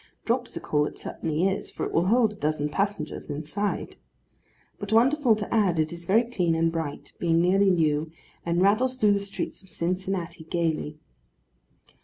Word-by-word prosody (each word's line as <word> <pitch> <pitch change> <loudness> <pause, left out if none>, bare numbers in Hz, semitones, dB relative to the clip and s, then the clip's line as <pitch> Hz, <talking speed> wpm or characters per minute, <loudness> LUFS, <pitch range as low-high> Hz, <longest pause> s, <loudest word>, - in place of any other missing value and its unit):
Dropsical 230 - 0
it - - -9
certainly 160 +3 -1
is, 195 - -2
for - - -4
it - - -4
will 170 +2 +2
hold 225 0 +3
a - - -13
dozen 150 -4 -1
passengers 195 -4 -2
inside. 155 +8 -3 0.8
But, 205 0 -6
wonderful 245 +1 +4
to 210 -1 -4
add, 200 -7 +3
it 155 +1 0
is 170 0 -8
very 215 +7 +4
clean 180 -9 0
and 165 0 +2
bright, 160 -3 -5
being 165 -1 +2
nearly 195 +3 +4
new; 155 -3 +1 0.3
and 170 +1 +1
rattles 240 +6 +3
through 210 -5 +4
the 200 - +1
streets 200 -1 -5
of 190 - -15
Cincinnati 180 -2 -2
gaily. 160 -3 -1
180 Hz, 165 wpm, -26 LUFS, 160-205 Hz, 0.8 s, wonderful